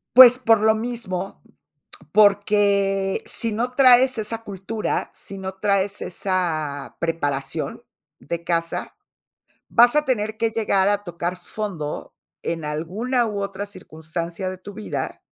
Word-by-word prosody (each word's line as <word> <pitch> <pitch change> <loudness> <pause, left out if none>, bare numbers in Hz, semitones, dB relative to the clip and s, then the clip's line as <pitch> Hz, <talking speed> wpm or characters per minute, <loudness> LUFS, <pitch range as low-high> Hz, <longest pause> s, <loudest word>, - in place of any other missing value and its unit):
Pues, 250 0 +10
por 225 -4 +4
lo 220 0 +5
mismo, 220 -5 -4 0.7
porque 200 -1 +3
si 230 - 0
no 240 +4 -2
traes 255 -1 +6
esa 225 +1 -3
cultura, 205 +1 -3
si 195 - -10
no 190 0 -6
traes 200 0 0
esa 165 -7 -2
preparación 145 -5 -2 0.4
de 170 +3 -5
casa, 165 -1 -2 0.7
vas 240 +3 +6
a 300 0 +3
tener 220 -4 -1
que 230 0 0
llegar 205 -4 +1
a 205 0 +1
tocar 175 -1 -3
fondo 180 -4 -5 0.3
en 165 -1 -3
alguna, 195 - -1
u, 210 -2 -3
otra 200 0 -4
circunstancia 170 -1 -6
de 185 - -8
tu 205 +2 -10
vida 215 +2 -5
200 Hz, 130 wpm, -22 LUFS, 175-220 Hz, 0.7 s, Pues